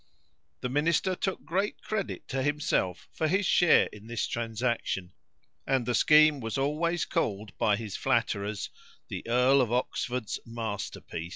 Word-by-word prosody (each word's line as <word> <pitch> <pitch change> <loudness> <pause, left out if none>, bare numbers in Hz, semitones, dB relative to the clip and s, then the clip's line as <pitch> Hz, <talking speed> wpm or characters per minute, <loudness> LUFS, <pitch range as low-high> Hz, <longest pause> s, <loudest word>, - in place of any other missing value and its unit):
The 125 - -2
minister 165 +7 +2
took 190 +1 -3
great 195 +5 -1
credit 215 -3 -3
to 135 - -1
himself 145 -10 0
for 160 - 0
his 190 +5 +1
share 175 -1 +5
in 105 +1 -12
this 120 -1 -1
transaction, 115 -5 -2 0.6
and 130 -3 +1
the 125 - 0
scheme 150 +3 +6
was 115 +1 -3
always 155 +5 0
called 105 0 -2
by 105 - +3
his 105 -2 -6
flatterers 100 +1 -1 0.4
"the - - -5
Earl 125 +3 +4
of 120 -3 0
Oxford's 125 -1 -2
masterpiece." 110 -7 -5
125 Hz, 145 wpm, -29 LUFS, 110-155 Hz, 0.6 s, scheme